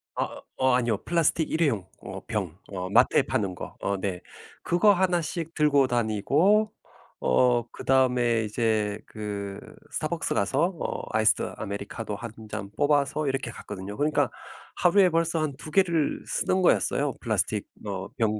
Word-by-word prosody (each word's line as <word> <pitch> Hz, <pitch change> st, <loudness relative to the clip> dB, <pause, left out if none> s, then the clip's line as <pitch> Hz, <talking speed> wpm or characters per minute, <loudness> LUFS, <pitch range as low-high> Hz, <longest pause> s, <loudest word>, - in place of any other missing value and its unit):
아 -, -, -3 dB, 0.2 s
어 130 Hz, 0 st, +3 dB
아니요. 120 Hz, -4 st, +1 dB
플라스틱 165 Hz, -1 st, +1 dB
일회용 130 Hz, -, +1 dB
어 95 Hz, +1 st, -7 dB
병 95 Hz, -7 st, -3 dB
어 90 Hz, -2 st, -5 dB
마트에 -, -, +5 dB
파는 95 Hz, -4 st, -1 dB
거. -, -, -8 dB
어 100 Hz, 0 st, 0 dB
네. 95 Hz, -2 st, -3 dB, 0.4 s
그거 205 Hz, +4 st, +4 dB
하나씩 175 Hz, -3 st, -1 dB
들고 145 Hz, -3 st, +4 dB
다니고 140 Hz, -, +2 dB, 0.5 s
어 120 Hz, -, +3 dB
그다음에 125 Hz, -3 st, +2 dB
이제 105 Hz, -1 st, 0 dB
그 100 Hz, -2 st, -5 dB, 0.3 s
스타벅스 -, -, -2 dB
가서 135 Hz, -, +2 dB
어 -, -, -3 dB, 0.2 s
아이스 110 Hz, 0 st, +5 dB, 0.2 s
아메리카노 100 Hz, +1 st, -5 dB
1 115 Hz, +2 st, -7 dB, 0.2 s
잔 100 Hz, -2 st, -5 dB
뽑아서 145 Hz, 0 st, +2 dB
이렇게 135 Hz, -2 st, -1 dB
갔거든요. 100 Hz, -2 st, -7 dB
그러니까 145 Hz, -4 st, +2 dB, 0.5 s
하루에 185 Hz, +1 st, +5 dB
벌써 165 Hz, -1 st, +1 dB
한 150 Hz, -3 st, -2 dB
2 155 Hz, -, -9 dB
개를 170 Hz, -5 st, +2 dB
쓰는 185 Hz, 0 st, 0 dB
거였어요 145 Hz, -5 st, +2 dB
플라스틱 110 Hz, -2 st, -1 dB, 0.2 s
어 95 Hz, -2 st, -4 dB
병 110 Hz, -2 st, +1 dB
120 Hz, 295 characters per minute, -26 LUFS, 105-155 Hz, 0.5 s, 마트에